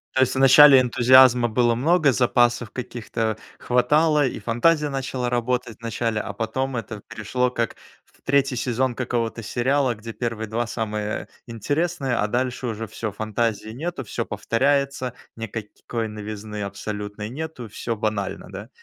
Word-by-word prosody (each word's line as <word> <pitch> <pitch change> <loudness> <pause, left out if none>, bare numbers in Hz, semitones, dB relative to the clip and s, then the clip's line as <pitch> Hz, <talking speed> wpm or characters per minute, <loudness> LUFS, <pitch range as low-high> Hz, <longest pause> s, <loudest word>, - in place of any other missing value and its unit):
То 130 - +3
есть 130 0 +2
вначале 135 +1 +8
энтузиазма 125 0 +6
было 120 +1 +2
много, 150 +3 +3
запасов 120 -2 +2
каких-то 115 -2 -3 0.2
хватало, 150 +4 +3
и - - -5
фантазия 150 +6 +2
начала 135 -2 -3
работать 120 -1 -1
вначале. 115 -1 -2
А 100 - -6
потом 125 +5 -2
это 110 -2 -6
пришло 125 +4 -1
как 115 -2 -2 0.3
в - - -29
3 135 -1 +2
сезон 125 +1 0
какого-то 120 -2 -2
сериала, 130 +3 +1
где 115 +1 -8
1 115 -2 -3
2 115 +2 -2
самые 105 -2 -3 0.2
интересные, 145 - -1
а 105 - +1
дальше 125 +2 -2
уже 115 -1 -4
всё- 110 0 -5
фантазии 110 +1 -2
нету, 145 +5 -4
всё 110 - -3
повторяется, 140 0 0 0.2
никакой 115 +1 -5
новизны 105 0 -6
абсолютной 105 +1 -5
нету, 145 -2 -6
всё 115 +2 -4
банально. 105 -2 -3
Да? 100 +4 -8
120 Hz, 140 wpm, -23 LUFS, 110-130 Hz, 0.3 s, вначале